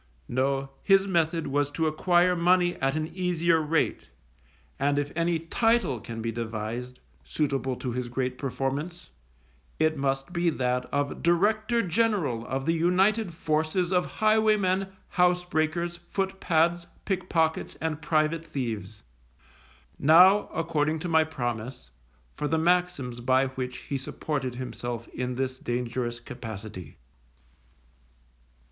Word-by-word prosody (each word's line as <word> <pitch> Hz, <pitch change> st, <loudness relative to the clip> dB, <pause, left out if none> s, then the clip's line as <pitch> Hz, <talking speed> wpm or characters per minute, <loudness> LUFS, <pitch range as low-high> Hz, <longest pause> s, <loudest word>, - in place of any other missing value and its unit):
No, 135 Hz, +2 st, 0 dB
his 195 Hz, -1 st, +4 dB
method 165 Hz, -3 st, +1 dB
was 145 Hz, +1 st, 0 dB
to 160 Hz, +2 st, -1 dB
acquire 175 Hz, +3 st, +3 dB
money 175 Hz, +1 st, +3 dB
at 135 Hz, +2 st, 0 dB
an 155 Hz, 0 st, -1 dB
easier 170 Hz, -3 st, +2 dB
rate, 155 Hz, +1 st, 0 dB, 0.7 s
and 140 Hz, +1 st, +1 dB
if 145 Hz, 0 st, -1 dB
any 170 Hz, 0 st, +1 dB
title 185 Hz, -, +1 dB
can 115 Hz, +1 st, -7 dB
be 115 Hz, -, -1 dB
devised 115 Hz, +2 st, -5 dB, 0.2 s
suitable 135 Hz, -, -1 dB
to 125 Hz, 0 st, -4 dB
his 125 Hz, 0 st, -3 dB
great 125 Hz, +1 st, -2 dB
performance, 140 Hz, +6 st, -3 dB, 0.7 s
it 155 Hz, 0 st, +2 dB
must 135 Hz, +4 st, -1 dB
be 170 Hz, -1 st, +2 dB
that 125 Hz, -4 st, -1 dB
of 145 Hz, 0 st, -1 dB
Director 215 Hz, +7 st, +2 dB
General 180 Hz, -, 0 dB
of 135 Hz, 0 st, -2 dB
the 165 Hz, -, +2 dB
united 185 Hz, +5 st, +2 dB
forces 160 Hz, +3 st, 0 dB
of 180 Hz, -1 st, +2 dB
highwaymen, 215 Hz, -3 st, +2 dB, 0.3 s
housebreakers, 175 Hz, -1 st, +1 dB
footpads, 175 Hz, -3 st, +1 dB, 0.2 s
pickpockets, 175 Hz, -5 st, 0 dB
and 160 Hz, -1 st, -3 dB
private 155 Hz, +1 st, +1 dB
thieves. 110 Hz, -, -5 dB, 1.0 s
Now, 180 Hz, +7 st, +6 dB
according 160 Hz, -1 st, 0 dB
to 175 Hz, -, -3 dB
my 160 Hz, -1 st, +4 dB
promise, 120 Hz, -, -5 dB, 0.4 s
for 150 Hz, -, -3 dB
the 160 Hz, +3 st, +1 dB
maxims 160 Hz, -8 st, +1 dB
by 130 Hz, +2 st, +2 dB
which 130 Hz, -1 st, -5 dB
he 140 Hz, -, -4 dB
supported 135 Hz, -1 st, -3 dB
himself 120 Hz, -2 st, -5 dB
in 125 Hz, 0 st, -3 dB
this 130 Hz, 0 st, -2 dB
dangerous 120 Hz, 0 st, -3 dB
capacity. 110 Hz, -8 st, -8 dB
155 Hz, 125 wpm, -27 LUFS, 130-175 Hz, 1.0 s, Now